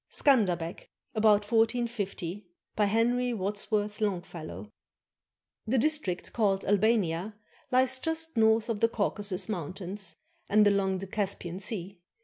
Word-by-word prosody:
SCANDERBEG 185 - +1 0.2
[About 215 -2 +4
1450] 225 -5 -1 0.3
BY 210 - +3
HENRY 240 +4 +1
WADSWORTH 210 +1 -2
LONGFELLOW 170 - -4 1.0
[The 255 +4 +2
district 255 - +1
called 200 -4 +1
Albania 205 -2 +1 0.3
lies 260 0 +3
just 320 +2 -2
north 220 0 +3
of 225 -3 -2
the 230 - +4
Caucasus 205 -3 -1
Mountains 185 -1 -4 0.3
and 210 0 +5
along 195 -2 +2
the 190 - -5
Caspian 190 -3 -3
Sea. 195 -2 -5
205 Hz, 115 wpm, -29 LUFS, 190-230 Hz, 1.0 s, and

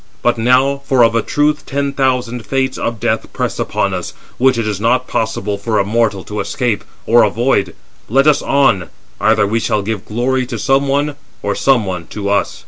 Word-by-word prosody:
But 120 - +3
now—for 130 +2 +3
of 115 - +4
a 115 - +2
truth 150 +5 0
ten 140 0 -2
thousand 125 -3 0
Fates 130 +3 -1
of 115 -1 -3
death - - -1
press - - -2
upon - - -1
us, - - -5 0.2
which 130 0 +3
it 115 -2 -1
is 105 -2 -3
not 125 +3 +2
possible 105 -3 -2
for 110 +1 -1
a 100 - +2
mortal 105 -2 0
to 105 0 -6
escape 105 +2 -1 0.2
or 120 +1 +5
avoid—let 120 +3 0
us 150 -2 +4
on: 115 - +2 0.3
either 110 -1 +3
we 110 +3 0
shall 105 -2 0
give 105 0 -4
glory 125 +3 -1
to 120 -2 -4
some 135 +6 +1
one, 145 +1 0 0.3
or - - 0
some 130 -6 +2
one 90 -3 -5
to 100 -1 -4
us." 100 - 0
120 Hz, 190 wpm, -16 LUFS, 105-135 Hz, 0.3 s, or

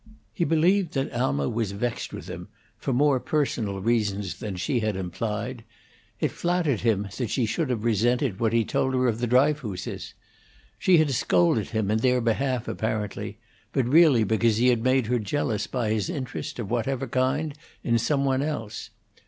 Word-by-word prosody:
He 170 - 0
believed 170 +2 +2
that 135 0 -1
Alma 70 - 0
was 110 -3 -2
vexed 115 +3 -3
with - - -8
him - - -7 0.3
for - - -3
more 135 +1 +3
personal 130 - -1
reasons 105 -3 -1
than 105 -5 -4
she 95 +8 0
had 110 -2 -1
implied; 105 +6 -4 0.6
it - - 0
flattered 175 - 0
him 105 -3 +1
that 125 -5 -2
she 125 +1 +1
should 140 +6 -1
have 115 -4 -1
resented 120 0 +1
what 115 -2 +2
he 115 -1 +2
told 130 +4 0
her 130 0 +2
of 115 -1 0
the 120 - 0
Dryfooses. 125 -6 0 0.6
She 185 -2 +5
had 155 -3 +3
scolded 95 -3 +2
him 110 -2 -1
in 110 - +2
their 125 +1 +3
behalf 125 +1 0
apparently; 110 -2 -3 0.4
but 130 - +2
really 145 -4 +6
because 110 +1 +2
he 125 +2 +4
had 120 -2 +2
made 130 -1 +3
her 120 +2 +1
jealous 110 -2 -1
by 120 -4 -1
his 110 +7 0
interest, 135 -7 -5
of 115 -4 -5
whatever 125 +3 -1
kind, 130 +5 0 0.3
in 115 -1 +2
some 140 +4 +1
one 135 0 +1
else. 115 -8 -4
120 Hz, 175 wpm, -26 LUFS, 110-135 Hz, 0.6 s, really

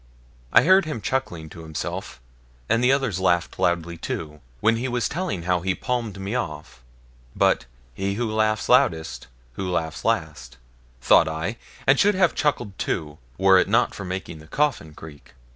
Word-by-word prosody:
I - - +6
heard 185 +2 +5
him 155 -6 -4
chuckling 100 -11 -3
to 85 - -11
himself, 80 -5 -5 0.5
and 115 +2 +2
the 125 - +5
others 135 -9 0
laughed 85 -2 +1
loudly 85 -1 0
too, 75 -1 -5 0.2
when 115 +5 +3
he 125 +3 -2
was 120 -1 0
telling 110 - -3
how 90 0 +1
he 95 +1 0
palmed 115 -5 -3
me 95 +3 -4
off; 75 - -5 0.5
but - - +2 0.3
'he 100 +6 -2
laughs 110 -2 0
loudest 80 - +2 0.3
who 90 +9 -4
laughs 80 -3 -2
last', 80 - -2 0.4
thought 80 - +5
I, 80 +8 -3 0.3
and 135 0 +4
should 205 0 +4
have 185 -3 +3
chuckled 120 -9 -1
too, 75 -3 -3 0.2
were 95 0 +6
it 90 - +1
not 120 +4 +3
for 100 - -7
making 90 -3 -5
the 80 - -14
coffin 135 - -1
creak. 75 -3 -13
95 Hz, 165 wpm, -24 LUFS, 80-120 Hz, 0.5 s, I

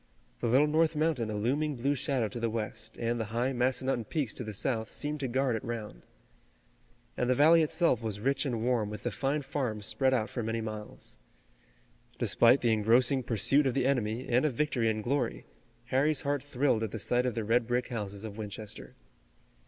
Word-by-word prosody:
The - - -1
Little 130 +6 +5
North 160 +1 +2
Mountain 150 -7 0
a 105 - -3
looming 140 +8 0
blue 135 +4 0
shadow 130 -4 0
to 120 - -6
the 115 0 0
west, 110 0 -5
and 120 0 -1
the 115 - -1
high 120 +5 -1
Massanutton 130 -1 0
peaks 140 -2 -2
to - - -5
the 110 - -5
south 110 0 -2
seemed 150 +1 -3
to 135 - -2
guard 130 0 +1
it 110 - -4
round. 110 - -6 1.1
And 125 - -1
the 130 - +4
valley 160 +5 +6
itself 160 - +2
was 110 -3 -3
rich 135 +4 +1
and 120 -6 -2
warm 120 -4 +1
with 105 - -7
the 120 - -1
fine 140 +7 -1
farms 125 -7 -3
spread 130 +5 +2
out 115 -4 +1
for 125 - -3
many 115 +1 -2
miles. 110 -1 -7 1.0
Despite 120 +3 +4
the 120 -2 +3
engrossing 120 +5 +3
pursuit 130 +5 +2
of 130 - -1
the 135 -2 +1
enemy 125 -2 0
and 125 +1 +2
of 150 -4 +1
victory 125 -5 +1
and 110 -1 -2
glory, 125 -1 -1 0.4
Harry's 140 +2 +1
heart 145 -1 -1
thrilled 135 -4 0
at 110 - -1
the 115 - -5
sight 125 +4 +1
of 125 - -2
the 115 - -1
red 115 +2 +2
brick 125 +1 0
houses 100 -3 -4
of 110 -1 -7
Winchester. 105 0 -7
120 Hz, 200 wpm, -30 LUFS, 110-135 Hz, 1.1 s, valley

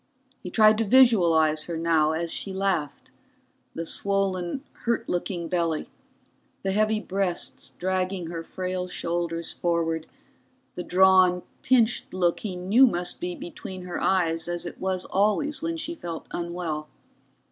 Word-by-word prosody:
He 180 - -6
tried 215 +2 +5
to - - +3
visualize 170 -11 +4
her 170 -2 -4
now, 160 -2 +2
as 165 +1 -2
she 195 - -4
laughed 190 -7 -2 0.6
the 165 - -3
swollen, 195 - -1 0.2
hurt 235 -1 0
looking 175 -1 -2
belly, 165 -3 -1 0.7
the 195 - 0
heavy 215 +2 +2
breasts 190 -3 -3
dragging 185 0 -1
her 165 0 -5
frail 185 +1 -4
shoulders 170 -1 -2
forward, 165 -2 -1 0.7
the 180 - -5
drawn, 185 0 +4 0.2
pinched 240 -6 +2
look 175 -2 +1
he 200 -4 -4
knew 200 +9 +5
must 175 -4 -2
be 180 0 -3
between 185 +2 -8
her 180 -1 -5
eyes 165 -3 +1
as 175 0 -3
it 175 - -7
was 185 -1 -1
always 240 +9 +1
when 330 0 -2
she 330 +1 -3
felt 170 - -6
unwell. 170 -3 -4
180 Hz, 140 wpm, -26 LUFS, 170-195 Hz, 0.7 s, tried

